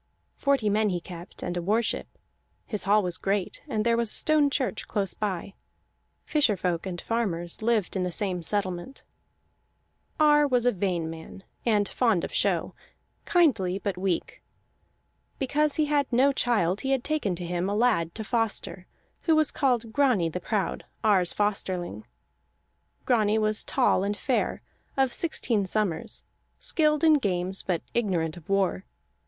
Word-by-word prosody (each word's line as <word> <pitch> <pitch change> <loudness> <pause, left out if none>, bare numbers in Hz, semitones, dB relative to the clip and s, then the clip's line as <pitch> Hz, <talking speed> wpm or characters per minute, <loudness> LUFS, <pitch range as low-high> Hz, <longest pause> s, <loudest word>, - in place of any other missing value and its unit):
Forty 280 -6 +1
men 210 +1 +2
he 180 -2 -1
kept, 175 +1 -10
and 175 - -3
a 175 - -1
war 215 +7 +1
ship; - - -2 0.6
his 210 -5 -3
hall 205 +1 +4
was 180 -2 -2
great, 195 -1 -1
and 215 0 -1
there 235 0 +3
was 235 -1 +2
a - - +1
stone 305 -2 +3
church 265 -5 -2
close 195 -3 0
by; 195 -2 -3 0.7
fisher 280 -10 +2
folk 180 0 -2
and 175 -2 -5
farmers 175 -8 -2
lived 220 -4 +1
in 190 - 0
the 180 0 -1
same 185 -1 -1
settlement. 190 +5 -3 1.2
Ar 295 -1 +5
was 250 -3 +2
a 245 - +5
vain 180 -5 -1
man 160 +4 -9 0.2
and 210 -3 +3
fond 225 -9 +1
of - - -5
show, - - +1 0.5
kindly 225 - +2
but 200 -1 -3
weak. 185 -1 -2 1.0
Because 290 +2 +1
he 310 - +2
had 290 -2 0
no 260 +4 +4
child 210 -8 +1
he 270 - -3
had 260 -2 0
taken 290 -12 -1
to 175 0 -6
him 175 +2 -1
a 205 - -1
lad 210 -8 +1
to 220 - -4
foster, 215 -5 -2 0.4
who 325 - +4
was 310 -2 +3
called 245 -5 0
Grani 250 - +3
the 180 - -4
Proud, 205 -1 -2 0.2
Ar's 195 -5 +3
Fosterling. 185 - -2 1.0
Grani 220 -4 +3
was 215 0 +1
tall 245 -7 +2
and 205 +1 -1
fair, 255 +2 -1 0.3
of 265 -2 +2
sixteen 240 -10 0
summers, 190 -4 -1 0.3
skilled 305 -1 +1
in 310 -2 +6
games 190 -3 -1
but 175 -4 -2
ignorant 175 -9 0
of 175 -1 -14
war. 195 - +1
210 Hz, 160 wpm, -27 LUFS, 180-245 Hz, 1.2 s, in